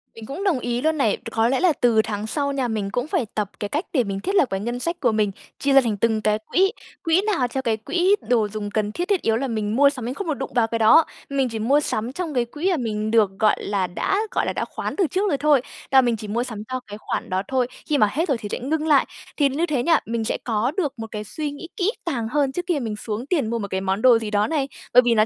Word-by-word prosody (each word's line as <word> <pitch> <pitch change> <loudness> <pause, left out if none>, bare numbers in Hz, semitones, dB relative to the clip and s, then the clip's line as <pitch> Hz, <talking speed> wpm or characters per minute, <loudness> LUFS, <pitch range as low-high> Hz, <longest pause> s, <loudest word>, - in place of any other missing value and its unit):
Mình 225 - -9
cũng 280 - -5
đồng 365 -10 +2
ý 245 0 -2
luôn 315 +2 +1
này. 225 -8 +2
C - - -9
có 225 0 +2
lẽ 260 +2 +1
là 365 -3 +4
từ 230 -3 +5
tháng 215 -1 -4
sau 280 +4 -1
nha, 270 -3 -1
mình 210 -3 -2
cũng 245 +6 -2
phải 280 - 0
tập 210 -2 -1
cái 205 - -3
cách 300 - -1
để 260 -6 +3
mình 195 -2 -3
thiết 390 - -2
lập 330 - +5
cái 195 - -2
ngân 240 +4 -3
sách 335 +6 -2
của 245 -6 +2
mình: 215 -2 +1 0.3
chia 280 0 +1
ra 270 - +8
thành 225 -5 -1
từng 220 +1 +1
cái 215 0 +1
quỹ, 385 +2 +3 0.3
quỹ 330 +3 +3
nào 400 -12 +1
cho 265 +2 -3
cái 230 -4 0
quỹ 355 - +2
đồ 230 -4 +3
dùng 205 0 -5
cần 210 0 -1
thiết, 350 +11 -3
thiết 400 -4 +1
yếu 225 0 +1
là 270 +3 -2
mình 215 -3 -2
mua 280 +2 +6
sắm 260 -5 -5
mình 245 - -2
không 390 +6 -5
được 315 - +1
đụng 270 -1 -5
vào 235 -2 +3
cái 230 0 -2
đó. 225 +9 +6 0.2
Mình 270 -2 0
chỉ 225 -1 -4
mua 265 +7 +3
sắm 235 -5 -2
trong 335 -1 -4
cái 245 -2 +1
quỹ 300 +10 -2
mà 350 - +1
mình 215 -4 -2
được, 220 -4 +4
gọi 215 -1 +4
là, 195 -2 0
đã, 285 - -1
gọi - - 0
là, - - -1
đã - - -2
khoán - - -5
từ 385 -4 +2
trước 390 +6 0
rồi 285 - +1
thôi, 290 -2 +4 0.3
là 265 -1 +7
mình 240 -2 +1
chỉ 215 - -7
mua 230 +4 -1
sắm 220 -4 -6
cho 255 - -1
cái 205 0 -8
khoản - - -4
đó 185 0 0
thôi, 255 -2 +1 0.2
khi 295 - +3
mà 215 - +5
hết 325 - 0
rồi 275 - +1
thì 210 -2 -7
sẽ - - -2
ngưng 310 +5 -1
lại. 290 -3 +5 0.3
Thì 285 -2 +4
như 300 +6 0
thế 285 -7 -1
nha, 330 +1 +4
mình 230 0 -2
sẽ 220 - -1
có 230 +2 0
được 300 -8 0
một 225 - -5
cái 210 -1 -4
suy 295 +8 -4
nghĩ 290 +4 -8
kỹ 390 +1 +2
càng 240 -9 -2
hơn 275 +2 +1
trước 355 +5 -4
khi 345 -5 +1
mà - - -4
mình 220 -2 -3
xuống 215 +2 -4
tiền 285 -7 0
mua 235 0 -1
một 200 - -3
cái 190 0 -2
món 190 +2 -1
đồ 245 -2 +6
gì 220 -2 -5
đó 205 0 +2
này, 295 -4 0 0.3
bởi 250 - +9
vì 235 -1 +3
là, 215 0 +5
245 Hz, 305 wpm, -23 LUFS, 215-295 Hz, 0.3 s, bởi